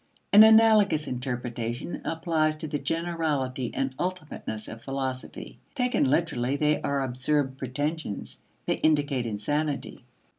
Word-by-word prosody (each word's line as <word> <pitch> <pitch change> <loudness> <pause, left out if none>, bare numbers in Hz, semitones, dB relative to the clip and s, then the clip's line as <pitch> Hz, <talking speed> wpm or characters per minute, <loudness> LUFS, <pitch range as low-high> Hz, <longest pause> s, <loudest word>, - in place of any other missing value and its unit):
An 205 - +10
analogous 220 -7 +6
interpretation 120 +1 -4
applies 160 -1 0
to 155 - -5
the 145 0 -2
generality 155 -7 -1
and 135 -1 -1
ultimateness 160 -11 -4
of 110 +1 -9
philosophy. 135 -1 -5 0.2
Taken 250 - +1
literally, 135 -4 +1
they 150 +1 +1
are 140 -1 0
absurd 135 +1 -1
pretensions; 145 -2 -4 0.2
they - - 0
indicate 145 -5 +1
insanity. 145 +8 -2
145 Hz, 115 wpm, -27 LUFS, 130-160 Hz, 0.2 s, An